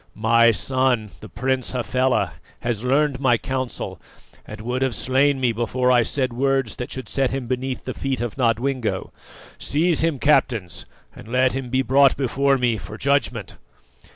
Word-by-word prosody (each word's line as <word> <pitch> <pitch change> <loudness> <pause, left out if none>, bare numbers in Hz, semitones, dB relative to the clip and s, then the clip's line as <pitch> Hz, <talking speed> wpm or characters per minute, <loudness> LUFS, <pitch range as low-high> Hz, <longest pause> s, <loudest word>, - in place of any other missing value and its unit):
My 115 +2 +4
son, 125 -1 0
the 110 - -11
Prince 130 +5 -2
Hafela, 125 +1 0 0.3
has 115 -2 -2
learned 140 +1 +1
my 130 -4 +3
counsel, 130 0 -4 0.5
and 105 - -9
would 125 +4 -3
have 130 -3 0
slain 135 +2 +2
me 125 -2 +2
before 125 +3 0
I 125 -1 +5
said 130 +2 -1
words 135 -1 0
that 125 - -5
should 130 -4 -6
set 135 +4 0
him 135 -2 -4
beneath 130 +1 -3
the 130 - -4
feet 135 -2 -3
of 120 -2 -3
Nodwengo. 125 -1 -1 0.5
Seize 160 +2 +2
him, 165 -3 +1
captains, 120 -9 +1 0.3
and - - -12
let 130 +2 +2
him 130 -1 -4
be 130 +1 +1
brought 135 +1 +4
before 135 +1 +1
me 120 -3 +1
for 110 - -9
judgment!" 140 -7 0
130 Hz, 165 wpm, -22 LUFS, 120-135 Hz, 0.5 s, I